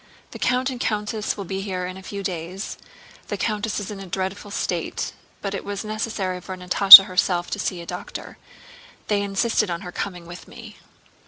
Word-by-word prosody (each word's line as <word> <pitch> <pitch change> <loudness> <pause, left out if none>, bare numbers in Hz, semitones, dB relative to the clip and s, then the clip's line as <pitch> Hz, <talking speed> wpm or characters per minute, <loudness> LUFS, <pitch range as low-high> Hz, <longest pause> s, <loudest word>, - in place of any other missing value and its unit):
"The - - -10
count 255 +1 0
and 250 - -7
countess 210 0 -2
will 200 - -6
be 190 +2 -4
here 185 -2 -4
in 185 0 -7
a 190 - -10
few 200 +1 -7
days. 180 +2 -5 0.5
The - - -4
countess 210 -2 -2
is 205 0 -6
in 200 - -8
a 195 - -9
dreadful 190 +3 -4
state; 200 - -3 0.3
but 200 -1 -3
it 195 - -5
was 200 +1 -6
necessary 215 -4 -3
for 185 +1 -8
Natásha 195 +2 +11
herself 180 -2 -1
to - - -3
see 180 -2 -3
a - - -10
doctor. - - -8 0.7
They 205 -1 +1
insisted 200 +1 0
on 170 +1 -4
her 180 -3 -8
coming 180 -2 -6
with 175 +1 -11
me." 230 -3 -13
195 Hz, 190 wpm, -22 LUFS, 185-210 Hz, 0.7 s, Natásha